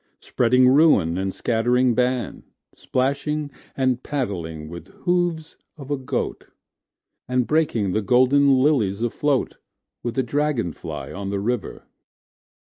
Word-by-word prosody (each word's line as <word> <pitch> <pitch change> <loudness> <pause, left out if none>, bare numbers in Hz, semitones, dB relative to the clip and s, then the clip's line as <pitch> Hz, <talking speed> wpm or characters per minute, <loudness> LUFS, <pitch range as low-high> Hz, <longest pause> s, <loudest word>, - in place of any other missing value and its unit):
Spreading 125 +1 +3
ruin 130 - +4
and 95 0 -1
scattering 120 +4 +1
ban, 125 -2 -1 0.3
Splashing 140 +3 -2 0.3
and 130 -2 +1
paddling 85 - -4
with 85 0 -9 0.2
hoofs 175 -3 0 0.2
of 140 -1 -9
a - - +2
goat, 130 -1 -4 0.8
And 125 -1 +1
breaking 120 -11 +1
the 110 - 0
golden 130 +6 +4
lilies 130 -7 +2
afloatWith 130 +3 0 0.5
the 120 +2 -1
dragon 140 - -1
fly - - -7
on 100 0 -5
the 100 0 -2
river. 115 +1 -3
125 Hz, 120 wpm, -22 LUFS, 110-140 Hz, 0.8 s, ruin